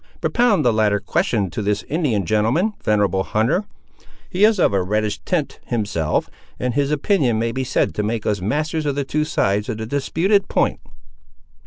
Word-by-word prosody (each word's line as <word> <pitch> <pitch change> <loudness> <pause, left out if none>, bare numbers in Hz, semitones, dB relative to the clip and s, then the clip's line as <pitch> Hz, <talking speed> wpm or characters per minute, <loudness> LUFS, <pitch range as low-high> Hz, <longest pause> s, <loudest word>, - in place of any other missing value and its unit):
Propound 220 - +2
the 120 - +4
latter 105 -2 +2
question 100 -1 0
to 95 - -4
this 105 0 -1
Indian 135 - -1
gentleman, 115 - +1
venerable 100 -3 +2
hunter; 115 - 0 0.7
he 185 +3 +1
is 215 -2 +5
of 105 - +3
a 95 - +2
reddish 105 +2 -1
tint 165 -6 -1
himself, 100 -10 -1 0.3
and 125 -1 -1
his 140 +1 +1
opinion 145 - +1
may 115 +1 0
be 130 +3 -2
said 125 - 0
to - - -2
make 110 +1 -2
us 100 -3 0
masters 150 - -1
of 140 - 0
the 140 - -1
two 150 +3 0
sides 105 -6 0
of 110 - -3
the 110 - -4
disputed 170 - +1
point." - - 0
115 Hz, 180 wpm, -21 LUFS, 105-155 Hz, 0.7 s, is